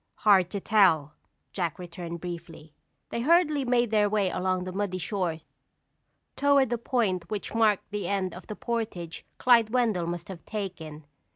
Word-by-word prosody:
"Hard 190 -4 +4
to 200 - -3
tell," 180 -9 +3 0.4
Jack 175 -5 -2
returned 170 -1 -7
briefly. 170 -3 -8 0.4
They 235 - -3
hurriedly 305 -1 +3
made 240 -2 +2
their 210 -1 +3
way 200 -3 +1
along 185 0 -1
the 185 - -5
muddy 190 -1 -2
shore 175 -3 -2 0.9
toward 280 -3 +3
the 240 - 0
point 215 -8 -1
which 210 -2 -4
marked 220 -4 +2
the 205 -3 -3
end 190 -2 -1
of 180 - -11
the 210 - -5
portage 215 -9 -4
Clyde 235 -3 +5
Wendell 220 -8 +1
must 170 0 -4
have 180 -4 -8
taken. 165 -8 -6
195 Hz, 160 wpm, -27 LUFS, 175-225 Hz, 0.9 s, Clyde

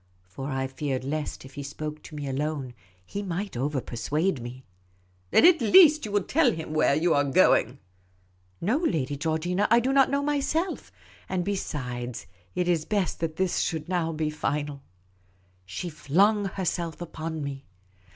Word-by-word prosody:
For 135 +10 -7
I 135 -1 -1
feared 130 0 -3
lest, 150 0 -4
if 135 - -13
he 145 - -6
spoke 150 +2 -6
to 155 - -11
me 145 -1 -4
alone, 135 -1 -2 0.3
he 200 - -5
might 195 -1 -4
over 135 +3 -1
persuade 145 +6 -1
me. 125 +2 -8 0.3
" 90 0 -37
Then - - +5
at 345 -5 +6
least 305 - +7
you - - -7
will 205 -1 +2
tell 285 - +3
him 160 -4 -5
where 155 -2 +3
you 165 +3 +2
are 145 - +3
going? 135 -3 +3 0.4
" 90 0 -37
No, 250 - +3
Lady 155 - 0
Georgina; 165 +6 0
I 235 +2 +6
do 260 +3 0
not 270 -1 +5
know 280 +1 0
myself. 295 +5 -1 0.4
And 180 -2 -1
be 200 0 0
sides, 125 - -4 0.3
it 180 -1 0
is 170 -3 +2
best 200 0 -1
that 160 -1 -2
this 185 0 0
should 160 -1 -2
now 175 -3 0
be 155 -1 -2
final." 145 -1 -2 0.9
She 95 - -5
flung 195 +7 +2
herself 175 -3 -2
upon 160 -2 -5
me. 140 -1 -6
155 Hz, 175 wpm, -27 LUFS, 135-190 Hz, 0.9 s, least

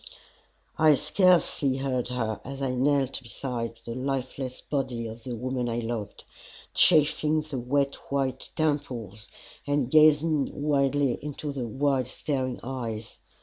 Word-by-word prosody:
I 155 -2 +7
scarcely 170 -6 +3
heard 130 -3 -1
her 115 -4 -2
as 135 +2 -6
I 130 - 0
knelt 135 +1 +1
beside 115 -2 -5
the 115 - -4
lifeless 130 0 -3
body 130 -5 -2
of 115 +1 -7
the 125 -2 -4
woman 125 +1 -2
I 115 - -2
loved, 115 -3 -4 0.5
chafing 155 -1 +4
the 150 -4 -5
wet 140 +3 0
white 135 -2 -1
temples 120 - -2 0.4
and 145 -3 0
gazing 155 -1 +5
wildly 140 -2 +1
into 150 0 -5
the 130 -4 -4
wide 135 +1 0
staring 130 -1 -2
eyes. 115 -4 -5
135 Hz, 130 wpm, -27 LUFS, 120-145 Hz, 0.5 s, I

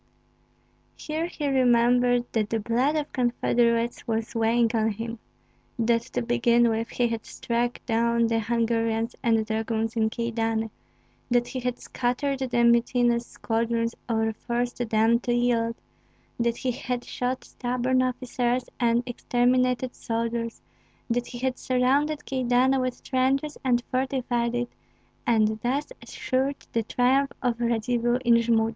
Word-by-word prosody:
Here 315 +2 -3
he 300 -4 -4
remembered 245 -2 +3
that 215 -2 0
the 225 - 0
blood 245 +7 +1
of 300 -2 -2
confederates 240 -1 +1
was 225 +2 -2
weighing 230 0 +2
on 220 -1 +2
him; 230 +2 -6 0.6
that 230 0 +2
to 125 - 0
begin 235 - +3
with, 225 +1 -1
he 245 - +1
had 230 -1 -3
struck 240 +1 -2
down 235 0 +2
the 225 0 +1
Hungarians 230 0 0
and 225 -2 +2
dragoons 220 +1 -2
in 220 -1 +2
Kyedani, 225 -1 -2 0.6
that 240 0 +2
he 260 - -4
had 250 -1 -2
scattered 260 +2 -2
the 245 -2 +1
mutinous 235 0 +3
squadrons 230 0 -1 0.2
or 225 -1 +1
forced 240 +2 -3
them 225 +2 +3
to 240 0 -1
yield, 235 -1 +1 0.6
that 235 0 +1
he 255 - -1
had 250 -1 -3
shot 255 +1 -3
stubborn 255 +1 0
officers 250 -1 -1
and 235 0 +2
exterminated 250 +1 +1
soldiers, 230 0 -3 0.5
that 245 +1 0
he 245 - -8
had 255 +1 -2
surrounded 280 +4 +1
Kyedani 260 +1 +2
with 255 -1 -3
trenches 270 +3 0
and 245 -2 +2
fortified 250 -2 0
it, 240 0 -1 0.6
and 220 -2 +2
thus 275 - -1
assured 265 +2 -1 0.2
the 230 - +2
triumph 260 +5 +1
of 240 -2 0
Radzivill 240 +1 +1
in 240 - +6
Jmud. 225 -1 +2
240 Hz, 140 wpm, -26 LUFS, 230-250 Hz, 0.6 s, in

